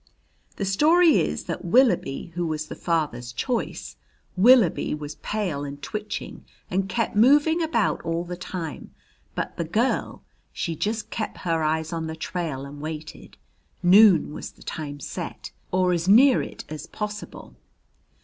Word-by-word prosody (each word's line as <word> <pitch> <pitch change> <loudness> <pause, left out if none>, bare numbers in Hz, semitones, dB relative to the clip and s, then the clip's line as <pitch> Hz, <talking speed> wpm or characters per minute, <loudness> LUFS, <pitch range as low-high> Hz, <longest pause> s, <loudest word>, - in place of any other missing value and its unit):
"The 200 - -2
story 315 - +5
is - - -1
that - - -5
Willoughby 180 - +2
who 175 0 -2
was 155 -1 -3
the - - -6
father's 150 -8 -2
choice 235 - -3 0.4
Willoughby 215 -5 +5
was 150 0 -7
pale 185 -10 -2
and 140 0 -6
twitching 210 +6 -6 0.3
and 190 +1 0
kep' 230 +2 -1
moving 290 +9 +5
about 275 -9 +1
all 165 +1 -2
the 175 0 -6
time. 175 -4 -7 0.4
But - - -4
the - - -1
girl, 220 +10 -1 0.3
she 165 - -3
just 215 +7 -3
kep' 215 - -4
her 165 -2 +1
eyes 160 +1 -1
on 165 -1 -3
the 160 - -5
trail 160 -5 -4
and 145 +1 -10
waited. 155 0 -8 0.5
Noon 185 -4 +6
was - - -7
the - - -17
time 145 -3 -6
set, - - -6 0.2
or 185 -1 +2
as 170 0 -1
near 250 +6 +6
it - - -8
as 155 -1 -7
possible. 210 -1 -7
175 Hz, 150 wpm, -25 LUFS, 155-215 Hz, 0.5 s, Noon